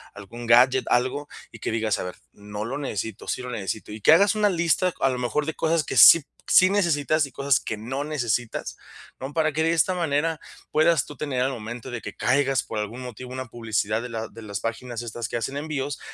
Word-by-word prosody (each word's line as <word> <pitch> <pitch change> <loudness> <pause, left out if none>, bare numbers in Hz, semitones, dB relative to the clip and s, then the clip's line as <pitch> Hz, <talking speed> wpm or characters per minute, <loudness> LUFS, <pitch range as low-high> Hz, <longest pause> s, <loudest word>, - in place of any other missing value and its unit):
algún 115 +4 -9
gadget, 125 +2 +5
algo, 130 +4 0 0.2
y 115 - -12
que - - -3
digas: 110 -3 0
"A - - -3
ver, 90 0 -6 0.2
no 105 +1 -7
lo 135 +5 -4
necesito, 110 -6 -5
sí - - -2
lo 125 - -6
necesito", 105 -1 -4
y 105 +1 -8
que - - +6
hagas 200 +6 +5
una 210 -1 +3
lista, 175 0 +1
a 135 - +4
lo 125 -1 -2
mejor, 125 +4 -1
de 160 - -3
cosas 160 0 +1
que - - -3
sí 140 +9 +10
p - - -28 0.2
sí 185 - +7
necesitas 155 -6 +1
y 140 - -11
cosas 140 -1 +2
que 110 - -4
no 130 +7 -4
necesitas, 120 -6 -2 0.4
¿no? 135 +2 -6
Para 155 0 +1
que, 160 - 0
de 165 +1 +2
esta 170 +3 +2
manera, 160 -1 0 0.3
puedas 155 -2 +3
tú 145 - -11
tener, 135 -3 -2
al 130 +2 +1
momento 120 +1 -7
de 120 - -4
que - - -8
caigas 135 0 +1
por 110 - -5
algún 110 +4 -5
motivo, 125 0 -8
una 130 -1 -5
publicidad 110 -2 -2
de - - -5
la 115 -1 -4
de 115 - -12
las 100 -2 -5
páginas 115 +1 -4
estas 120 -1 -5
que - - -5
hacen 135 +5 -3
envíos, 145 -2 -3
130 Hz, 230 wpm, -24 LUFS, 115-150 Hz, 0.4 s, sí